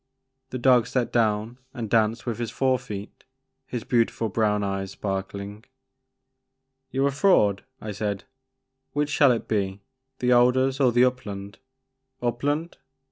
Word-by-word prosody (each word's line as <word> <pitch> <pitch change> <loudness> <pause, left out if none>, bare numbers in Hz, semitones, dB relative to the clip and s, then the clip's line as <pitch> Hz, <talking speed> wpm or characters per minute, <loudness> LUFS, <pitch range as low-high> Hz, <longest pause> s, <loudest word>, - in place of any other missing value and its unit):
*' 130 0 -53
The 130 - -4
dog 125 -2 +4
sat 125 -2 -1
down 110 +1 +1 0.2
and 120 -3 -4
danced 110 +1 +1
with 120 -2 -3
his 120 -2 -2
fore 130 +1 +1
feet, 105 -5 -8 0.4
his 120 -3 -4
beautiful 115 -2 +1
brown 105 0 +1
eyes 100 -1 -2
sparkling. 100 +1 -5 1.3
You 135 +1 0
're - - +4
a - - -3
fraud," 135 - +3 0.2
I 105 - -5
said; 100 -1 -3 0.7
which 145 0 0
shall 145 -2 +5
it 115 - -1
be, 100 -2 -1 0.4
the 125 0 +1
alders 130 +2 +3
or 130 -3 +4
the 120 +2 +5
upland? 100 -6 -4 0.6
Upland? 145 +7 -2
120 Hz, 145 wpm, -25 LUFS, 105-130 Hz, 1.3 s, shall